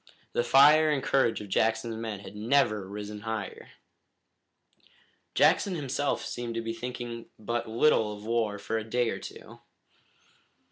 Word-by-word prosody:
The 120 - +1
fire 150 +5 +6
and 145 -3 0
courage 125 -6 +2
of 105 - -9
Jackson's 115 +3 +1
men 110 -3 -5
had 100 - -11
never 110 -3 +1
risen 105 +1 -6
higher. 110 -2 -5 1.7
Jackson 195 -3 +4
himself 145 -2 -1
seemed 120 -1 -5
to 115 - -1
be 115 0 -3
thinking 120 0 -6
but 115 +2 -3
little 115 -2 +3
of 105 - -12
war 110 -2 0
for 110 +2 -2
a - - -5
day 120 +1 0
or - - -4
two. - - -11
115 Hz, 145 wpm, -28 LUFS, 110-125 Hz, 1.7 s, fire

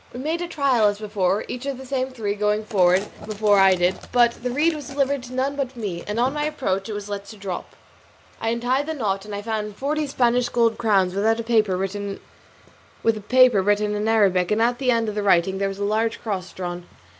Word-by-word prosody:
We 245 - -7
made 320 +5 -2
trial 265 -9 +2
as 205 0 0
before, 205 -2 -1
each 250 +3 -6
of 275 -2 -3
the 265 - -10
same 260 0 -2
three 220 -6 -3
going 210 +1 0
forward 190 -2 +3 0.2
before 210 -1 +2
I 190 -1 +6
did; 180 +1 +1
but 240 -1 +5
the 250 - -2
reed 300 +7 +2
was 295 -4 -7
delivered 275 0 0
to 250 - -10
none 270 +2 0
but 270 -2 -3
me, 195 -7 -4
and 210 +2 -2
on 255 +3 +2
my 295 0 -1
approach 225 -10 -2
it - - -3
was 205 0 -6
let 200 0 -6
drop. 190 -3 -6 0.7
I 225 - 0
untied 245 +5 0
the 320 - -3
knot 200 -6 -2
and 210 -1 -6
I 205 - -5
found 210 -2 -3
forty 295 +5 -1
Spanish 245 -2 +1
gold 230 -2 +1
crowns 195 -5 +2
with 200 +1 -1
a 225 +1 +1
paper 215 -5 +2 1.8
written 205 +1 +1
in 210 +1 -1
Arabic, 195 -5 +3
and 210 - +1
at 240 +2 +1
the 260 -2 0
end 230 -2 +2
of 210 - -2
the 210 - -2
writing 190 -1 +2
there 195 - +1
was 195 - -6
a 200 - -3
large 220 +2 0
cross 190 -5 -4
drawn. 175 -1 -6
220 Hz, 215 wpm, -23 LUFS, 200-250 Hz, 1.8 s, I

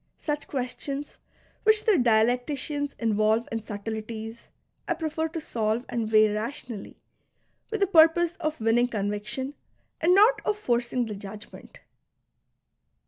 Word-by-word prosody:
Such 295 -1 -3
questions, 275 +2 -4 0.4
which 435 0 +4
the 445 - +5
dialecticians 255 - +1
involve 220 0 +1
in 225 0 -2
subtleties, 220 +2 -6 0.4
I - - 0
prefer 320 0 -2
to 325 +1 -5
solve 230 -4 -1
and 225 -2 -2
weigh 215 0 +7
I'ationally, 225 -1 -6 0.7
with 435 -2 -3
the - - +6
purpose 335 0 +5
of 310 -2 -3
winning 230 +2 +3
conviction 215 +5 -3 0.5
and 355 +3 +5
not 425 +3 +5
of 420 - 0
forcing 240 - 0
the 220 - -5
judgment. 205 +1 -11
245 Hz, 125 wpm, -26 LUFS, 220-315 Hz, 0.7 s, weigh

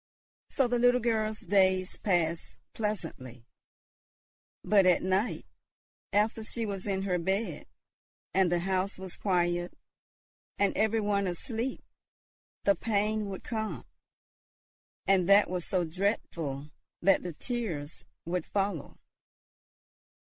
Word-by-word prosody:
So 270 - +2
the 245 0 +1
little 245 +1 +5
girl's 220 -2 0
days 185 -1 +2
passed 170 -4 0 0.2
pleasantly. 160 - -4 1.2
But 200 -3 +5
at 180 - +4
night, 190 +5 0 0.7
after 215 +2 +1
she 230 +1 -3
was 200 -1 -4
in 195 -1 0
her 180 -2 0
bed, 190 -1 -2 0.7
and 185 -2 +3
the 175 -1 +2
house 190 +1 -1
was 190 -1 -6
quiet, 175 -2 0 0.8
and 200 - +2
every 220 +1 +2
one 200 -1 +1
asleep, 225 +8 -3 0.8
the 200 - +5
pain 210 +1 0
would 190 - -6
come, 220 -2 -3 1.2
and 190 -2 +3
that 200 -1 +6
was 180 -2 -3
so 185 -3 +1
dreadful 160 -5 -2 0.3
that 195 -1 +5
the 175 -2 -5
tears 170 - -4 0.2
would 175 0 -2
follow. 195 -7 -2
195 Hz, 115 wpm, -30 LUFS, 175-215 Hz, 1.2 s, that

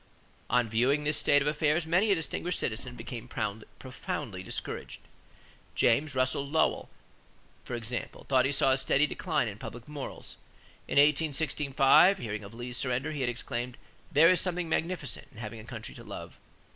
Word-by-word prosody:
On 125 -1 +3
viewing 125 +7 +2
this 150 0 +2
state 145 -1 +4
of - - -2
affairs, 150 +2 +1
many 180 +6 +3
a - - +5
distinguished 170 +1 -2
citizen 120 +2 -3
became 120 -2 -7
profoundly 110 -1 -5
discouraged. 95 - -5 0.8
James 140 +5 +2
Russell 130 +2 +1
Lowell, 160 +3 +1 0.7
for - - -5
example, 120 +1 -5
thought 130 -2 +4
he 135 - +1
saw 135 -1 +4
a 130 - +3
steady 140 +2 +3
decline 155 -5 -1
in 105 -1 -6
public 120 +1 -8
morals. 145 -2 -7 0.5
In - - -3
1865, 150 +3 +4
hearing 110 - -5
of 100 +3 -11
Lee's 120 +1 -5
surrender, 130 +4 0
he 150 -3 -4
had 125 - +1
exclaimed: 120 +1 -4 0.3
"There 165 +4 +7
is 180 - +3
something 180 -2 -1
magnificent 160 -5 -2
in - - -18
having 110 0 -7
a 110 - -11
country 115 -2 -7
to - - -11
love!" - - -9
135 Hz, 165 wpm, -29 LUFS, 120-150 Hz, 0.8 s, There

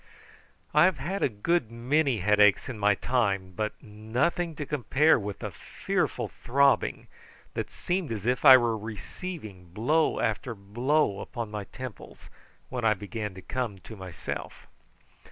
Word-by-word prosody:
I 150 +3 +7
have 185 -4 +2
had 175 +9 -3
a - - +3
good 120 +5 0
many 125 - +1
headaches 105 0 +4
in 120 -5 -6
my 105 0 +4
time, 100 -6 0
but 110 +2 -2
nothing 125 +11 -1
to 145 - -4
compare 150 +2 +3
with 100 -1 -5
the - - -5
fearful - - -2
throbbing, 140 +2 +1 0.5
that - - -3
seemed 175 -6 -2
as 105 -2 -4
if 125 +1 +1
I 130 - +11
were 120 -2 +1
receiving 110 - -7
blow 120 - +1
after 115 +1 -1
blow 110 +3 0
upon 115 -3 -5
my 105 -1 -4
temples, 130 +2 -10 0.4
when 125 -2 -4
I 110 -1 +4
began 105 -1 -5
to 95 - -10
come 125 -6 -3
to 110 +4 -11
myself. 95 -4 -7
115 Hz, 150 wpm, -28 LUFS, 105-140 Hz, 0.5 s, I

